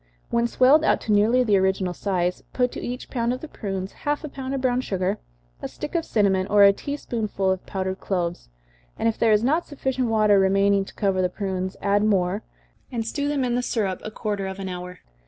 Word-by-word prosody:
When 235 0 +2
swelled 265 +6 +5
out - - +3
to 220 - -2
nearly 220 +5 +4
the 210 -4 +3
original 190 -1 0
size, 180 -1 -1
put 250 -1 +1
to - - -6
each 250 +1 -5
pound 235 -1 0
of 255 - -6
the 315 - -7
prunes 195 -7 -5
half 295 +1 -3
a 300 - -5
pound 270 0 -5
of 270 - -2
brown 250 -1 +1
sugar, 185 -6 -1 0.4
a - - -3
stick - - -7
of 335 -2 0
cinnamon, 195 -3 +2
or 205 0 +5
a 200 0 +8
tea 285 +7 -5
spoonful 210 -7 -1
of 190 -1 -2
powdered 190 0 -3
cloves, 175 - -3 0.5
and - - 0
if 225 - -1
there 225 - +4
is 210 +1 +4
not 310 +7 +1
sufficient 265 -3 -2
water 215 -3 +4
remaining 195 +1 +3
to - - -13
cover 195 -2 +1
the 180 - +1
prunes, 185 -1 -3
add 205 +1 +2
more, 195 -1 +1 0.5
and 230 -3 -2
stew 285 +5 -2
them 290 -2 0
in 245 -1 0
the 245 - +1
syrup 205 -6 -1
a - - -4
quarter 205 -3 -3
of 190 0 -6
an 195 -1 -5
hour. 180 0 -7
210 Hz, 225 wpm, -24 LUFS, 190-250 Hz, 0.5 s, a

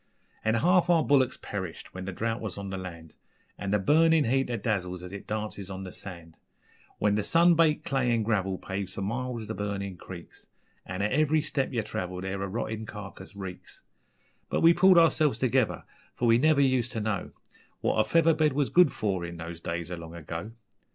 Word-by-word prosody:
An' 110 +1 +2
half 175 +8 +3
our 165 -2 +5
bullicks 135 -3 +3
perished 95 -5 -6
when 95 0 -6
the 95 - -3
drought 115 +5 -2
was 110 -4 -5
on 100 -1 -5
the 95 - -3
land, 85 -4 -9 0.4
An' 100 - -5
the 105 - +3
burnin' 160 +9 +4
heat 135 +2 +1
that 115 -4 -4
dazzles 90 -4 -2
as 90 +1 -8
it 100 - -8
dances 105 -2 -4
on 95 0 -6
the 95 - -7
sand; 85 -4 -10 0.6
When 105 -1 +2
the 105 - +1
sun 170 - +5
baked 155 -2 +3
clay 135 -6 +1
an' 115 -2 +2
gravel 95 -4 0
paves 95 0 -5
for 100 - -3
miles 120 +2 -3
the 110 - -3
burnin' 100 -2 -4
creeks, 85 0 -11 0.4
An' 95 +1 -3
at 105 - 0
ev'ry 155 0 +2
step 140 -3 -1
yer 115 -4 -1
travel 90 -3 -4
there 95 +1 -4
a 100 - -2
rottin' 110 +1 -4
carcase 100 -2 -9
reeks 95 -2 -9 0.7
But - - 0
we 165 +1 +7
pulled 185 +1 +6
ourselves 160 -3 +4
together, 130 -2 +1 0.3
for 120 - 0
we 115 0 +5
never 155 0 +4
used 130 -2 +2
ter 115 - -2
know 105 -3 -2 0.5
What - - +1
a - - +6
feather 165 +3 +4
bed 155 -2 +2
was 140 -1 +1
good 175 -4 +6
for 95 -5 -2
in 85 0 -6
those 85 0 -7
days 85 0 -4
o' - - -2
long 85 0 -9
ago. 85 +6 -6
105 Hz, 205 wpm, -28 LUFS, 95-135 Hz, 0.7 s, we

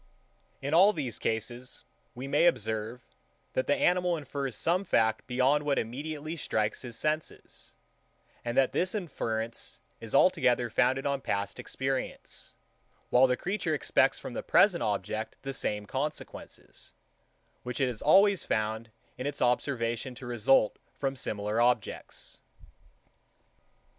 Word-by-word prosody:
In 140 +2 -2
all 195 +5 +7
these 140 - -3
cases, 120 - -3 0.3
we 130 +3 -6
may 145 +5 +4
observe, 110 -1 -1 0.5
that 130 - 0
the 145 - +3
animal 180 -1 +2
infers 140 -4 -4
some 180 +4 +1
fact 110 - +1
beyond 130 +4 +2
what 145 -1 +1
immediately 150 +7 -4
strikes 110 -8 -1
his 120 -3 -7
senses; 155 +3 -4 0.7
and 120 0 -3
that 135 - +4
this 185 +3 +1
inference 115 - -3 0.2
is - - -4
altogether - - +3
founded 135 +1 +2
on 140 -1 0
past 100 -3 -2
experience, 135 - -4 0.6
while 130 +2 +6
the 125 0 +1
creature 200 +4 -1
expects - - +2
from - - -7
the - - -3
present 195 - +4
object 105 +2 -2
the 135 0 -4
same 105 -5 -1
consequences, 145 +7 -6 0.7
which 125 -1 -5
it 135 - +3
has 120 -4 -4
always 195 +5 +5
found 110 +1 -2 0.3
in 130 - -2
its 145 - -4
observation 125 -1 0
to 130 - -10
result 120 -1 +3 0.2
from 135 -1 -2
similar 105 -2 -1
objects. 120 -3 -1
130 Hz, 135 wpm, -29 LUFS, 115-150 Hz, 0.7 s, all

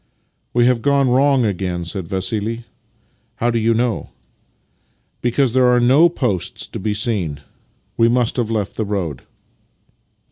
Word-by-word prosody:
" - - -48
We 120 0 +4
have 125 -2 +2
gone 140 -1 +2
wrong 135 -1 +3
again," 90 -4 -2
said 90 0 -5
Vassili. 105 +5 -3 0.3
" 115 +1 -42
How 120 0 0
do 115 - 0
you 115 +1 +2
know? 120 -1 -1 0.4
" - - -44
" - - -44
Because 120 +1 +1
there 130 -1 +4
are 125 0 +4
no 135 +8 +5
posts 120 - -2
to - - -8
be 105 +1 -2
seen. 100 -10 -2 0.6
We 115 - +4
must 120 0 +1
have 120 -3 0
left 105 -3 -2
the 110 - 0
road." 90 -10 -3
115 Hz, 170 wpm, -19 LUFS, 100-125 Hz, 0.6 s, no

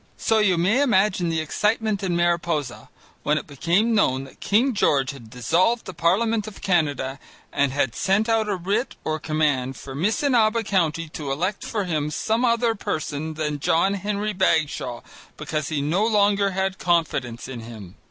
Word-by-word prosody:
So 225 - +2
you 195 -4 +3
may 200 +11 +2
imagine 190 -8 +2
the 160 -1 0
excitement 210 +5 0
in 185 -3 -1
Mariposa 170 -6 -1 0.3
when 150 +1 +1
it - - -4
became 170 - +1
known 135 -11 +2
that 135 - -14
King 245 +6 +2
George 140 -9 +2
had 125 -6 -12
dissolved 175 - +1
the 185 - -7
parliament 210 +6 +1
of 215 - -10
Canada 145 -7 0 0.3
and 140 -1 +2
had 135 -3 0
sent 195 - +1
out 225 -2 +1
a 200 - +1
writ 200 +8 -2
or 155 0 -2
command 145 -5 0
for 135 - -9
Missinaba 225 - +2
County 165 -5 0
to 150 -2 -5
elect 180 +9 -2
for 210 -2 -2
him 155 -5 -1
some 220 +10 -1
other 235 -1 +2
person 155 -5 -4
than 150 -1 -2
John 175 +5 +2
Henry 205 +1 -2
Bagshaw 155 -9 0 0.4
because 155 -2 -3
he 145 -3 -1
no 170 +8 +1
longer 205 -2 +3
had 190 +1 -2
confidence 140 -10 0
in 130 -3 -7
him. 110 -5 -10
175 Hz, 170 wpm, -23 LUFS, 145-210 Hz, 0.4 s, you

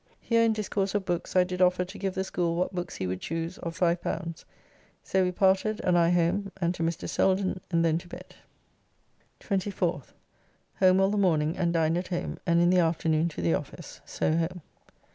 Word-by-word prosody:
Here 230 -1 +2
in 230 -1 +4
discourse 205 -2 -2
of 200 -2 0
books 175 0 -3
I 185 - +6
did 180 0 -4
offer 180 0 +3
to 190 +3 -10
give 195 -2 -2
the 190 - 0
school 175 -3 -1
what 180 +3 -1
books 175 -1 -4
he 95 - -3
would 90 0 -3
choose 165 +2 -4
of 165 -1 -6
L5. 170 -1 -1 0.6
So 190 0 +1
we 180 - 0
parted, 195 +3 +2
and 180 - +2
I 170 -1 +4
home, 180 +3 +1
and 170 -1 +1
to 175 - -7
Mr. 165 +1 -2
Selden, 190 -1 +1
and 170 -2 +2
then 165 0 +2
to 175 - -14
bed. - - -11 1.1
24th. 185 - -2 0.7
Home 185 0 +5
all 195 +1 +3
the 210 - 0
morning 160 -4 +2
and 175 -3 0
dined 165 0 +1
at 180 - -6
home, 175 - -4
and 170 0 +4
in 175 +1 +4
the 185 - +4
afternoon 165 -1 +1
to 90 - -6
the 85 -1 +2
office. - - -6
So 155 - -1
home. 170 +1 -2
175 Hz, 200 wpm, -27 LUFS, 165-190 Hz, 1.1 s, I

